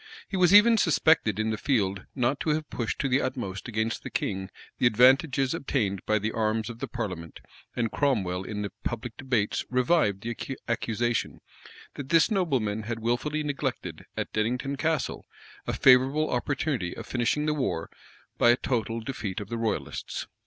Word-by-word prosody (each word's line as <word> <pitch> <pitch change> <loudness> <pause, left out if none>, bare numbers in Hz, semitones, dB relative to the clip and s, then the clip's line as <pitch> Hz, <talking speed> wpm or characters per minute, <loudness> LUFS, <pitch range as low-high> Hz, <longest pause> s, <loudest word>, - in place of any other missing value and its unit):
He 195 - -5
was 185 -1 +4
even 215 +3 +7
suspected 160 - +3
in 110 0 0
the 110 - -3
field 100 -8 0
not 130 +2 +1
to - - -2
have 155 -1 -5
pushed 115 -5 -2
to 140 - 0
the 135 +1 +2
utmost 110 -8 -4
against 110 0 -2
the - - -7
king 95 0 -3 0.3
the 120 - +5
advantages 130 +3 +4
obtained 100 -9 -1
by 110 - +3
the 110 +2 -2
arms 110 0 -1
of 115 - -11
the - - -3
parliament; 90 -9 -5 0.4
and 115 -2 -1
Cromwell 95 -11 0
in 105 +1 -4
the 100 - -4
public 120 0 -4
debates 125 -6 0
revived 125 - +2
the 120 +3 -5
accusation, 120 0 -1 0.5
that 135 -2 -7
this 165 +6 +4
nobleman 130 - 0
had 115 +2 -4
wilfully 120 +7 -1
neglected 145 -2 -4
at - - -3
Dennington 125 +6 -1
Castle 160 0 -1 0.4
a - - -1
favorable 135 +4 +4
opportunity 125 - -1
of - - -7
finishing 130 +5 0
the 155 - +1
war 130 - -2 0.5
by - - +6
a 120 - +6
total 115 -3 -2
defeat 110 -6 -4
of 105 -1 -7
the 115 - -3
royalists. 115 -2 -3
120 Hz, 170 wpm, -27 LUFS, 110-140 Hz, 0.5 s, even